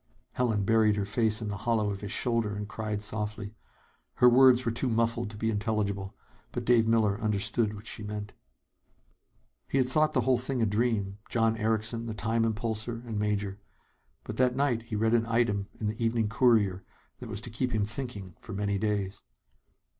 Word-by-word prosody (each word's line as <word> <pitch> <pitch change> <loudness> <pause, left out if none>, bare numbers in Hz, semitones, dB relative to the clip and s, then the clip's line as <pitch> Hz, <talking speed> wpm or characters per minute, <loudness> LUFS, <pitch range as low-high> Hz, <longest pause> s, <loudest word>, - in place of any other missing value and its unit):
Helen 110 -5 0
buried 110 -1 +4
her 100 -1 -1
face 110 +1 +1
in 105 - -3
the 100 - -3
hollow 110 -3 +2
of 100 - -6
his 105 -1 -4
shoulder 115 -4 +1
and 105 0 -4
cried 105 +1 -4
softly. 105 0 -3 0.6
Her 125 - +6
words 125 0 +6
were 115 - +1
too 120 +3 -1
muffled 115 0 0
to 105 - -10
be 110 +1 0
intelligible. 105 -2 -2 0.4
But - - -4
Dave 115 -2 +4
Miller 110 -2 +2
understood 105 +1 0
what 105 +1 -11
she 110 - -4
meant. 105 0 -6 1.3
He - - -1
had 130 -2 +3
thought 155 +4 +2
the 130 - +3
whole 125 0 +2
thing 130 +1 -2
a 115 - +3
dream 105 -2 0
John 115 -1 +2
Erickson, 110 +1 -1
the 110 - -4
"time 115 +2 0
impulsor" 115 +2 -3
and 110 -3 -3
Major. 105 -1 -1 0.6
But - - -7
that 125 -1 +3
night 135 -4 +1
he 115 -1 -6
read 110 +2 +2
an 115 -1 +2
item 115 -4 +1
in 110 - -3
the 110 +2 -2
Evening 115 -2 +1
Courier 110 -6 +3 0.4
that 125 - -8
was 105 -2 -4
to 120 - -6
keep 125 +3 0
him 110 -3 +1
thinking 105 -5 -6
for 115 - -8
many 100 0 -1
days. 100 -2 -2
110 Hz, 190 wpm, -29 LUFS, 105-115 Hz, 1.3 s, Her